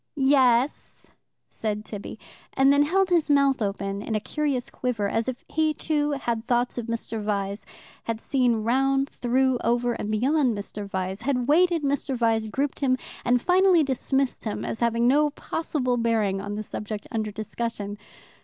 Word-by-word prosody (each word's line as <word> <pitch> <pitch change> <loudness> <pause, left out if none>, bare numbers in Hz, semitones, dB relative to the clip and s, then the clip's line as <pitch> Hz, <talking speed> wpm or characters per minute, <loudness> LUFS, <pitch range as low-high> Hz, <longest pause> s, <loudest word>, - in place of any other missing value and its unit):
"Ye 275 -1 +3
es," 255 0 +2 0.4
said 210 -1 -4
Tibby, 205 0 -7 0.4
and 270 +1 +5
then 285 - +4
held 375 +6 +2
his 335 -3 +3
mouth 280 -3 +3
open 200 -1 -2
in 220 +1 -3
a - - +2
curious 280 +1 -2
quiver, 230 -5 -1
as 225 +3 -1
if 255 -1 -5
he, 310 -1 0
too, 295 -2 0
had 235 -4 -3
thoughts 245 0 +1
of 235 - -5
Mr. 230 -1 -3
Vyse, 200 0 -2 0.4
had 230 -1 -2
seen 245 -4 +1
round, 270 +3 +2
through, 255 +1 +1
over, 240 +1 +1
and 210 - -4
beyond 250 +2 +2
Mr. 205 0 -6
Vyse, 190 0 -3
had 250 -3 -1
weighed 345 +5 +5
Mr. 285 -5 -1
Vyse, 225 -2 +1
grouped 275 +6 -2
him, 255 -2 +2 0.3
and 245 0 +2
finally 365 -2 +5
dismissed 270 0 -1
him 215 - -3
as - - -4
having 235 0 +2
no 295 +3 +4
possible 280 -4 -2
bearing 220 -4 +1
on 205 +1 -5
the 215 - -4
subject 210 0 -6
under 220 -3 -2
discussion. 215 -1 -4
245 Hz, 170 wpm, -25 LUFS, 215-275 Hz, 0.4 s, and